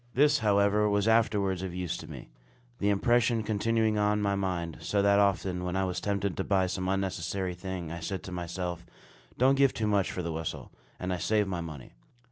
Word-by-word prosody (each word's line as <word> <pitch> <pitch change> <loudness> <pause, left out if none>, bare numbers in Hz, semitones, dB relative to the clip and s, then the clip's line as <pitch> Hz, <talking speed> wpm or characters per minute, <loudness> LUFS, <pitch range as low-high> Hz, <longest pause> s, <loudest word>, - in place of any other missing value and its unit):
This, 150 +2 +4
however, 105 -1 +3
was 100 +1 +1
afterwards 105 -5 +2
of 95 -2 -5
use 90 -2 -2
to - - -10
me, - - -9 0.5
the 100 - +1
impression 115 +2 +2
continuing 110 0 +1
on 105 0 +2
my 100 -1 +1
mind; 90 -4 -2
so 100 -1 0
that 100 0 +4
often, 95 -2 +1
when 90 0 -2
I 95 - +1
was 90 -1 -3
tempted 100 -2 -1
to 95 - 0
buy 95 -1 +2
some 95 0 -2
unnecessary 95 -1 -2
thing, 90 -2 -6
I 85 - -5
said 95 +3 -4
to 95 - -8
myself, 90 0 -4 0.5
"Don't 130 +2 +5
give 135 -1 +3
too 110 - -1
much 100 -3 +1
for 90 - -4
the 85 -1 -3
whistle"; 80 0 -5 0.3
and 90 0 -2
I - - -1
saved 105 +2 +1
my 90 -2 -2
money. 75 -6 -9
95 Hz, 205 wpm, -29 LUFS, 90-105 Hz, 0.5 s, Don't